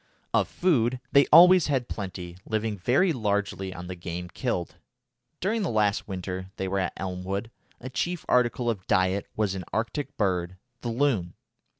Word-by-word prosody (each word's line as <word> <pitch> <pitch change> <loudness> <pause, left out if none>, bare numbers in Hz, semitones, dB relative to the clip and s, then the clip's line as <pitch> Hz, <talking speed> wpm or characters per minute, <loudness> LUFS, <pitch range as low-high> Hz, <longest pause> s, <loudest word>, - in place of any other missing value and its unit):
Of - - +3
food 130 -9 +1
they 140 0 +6
always 180 +1 +8
had 130 -4 0
plenty, 90 -3 -6
living 110 0 -1
very 130 - +2
largely 100 -5 -1
on 90 -1 -8
the 90 - -5
game 90 0 -6
killed. 90 -6 -3 0.6
During 215 +5 0
the 195 - 0
last 105 -3 +1
winter 95 -1 -5
they 95 - -3
were 95 +1 0
at 95 - -1
Elmwood 95 +4 -4 0.3
a 125 - -7
chief 175 +6 -2
article 125 0 +2
of 105 -5 -2
diet 95 +2 +2
was 105 -3 0
an 95 -1 -4
Arctic 125 +6 -3
bird, 90 -3 0 0.2
the 120 - -3
loon. 115 -8 0
105 Hz, 165 wpm, -27 LUFS, 95-125 Hz, 0.6 s, always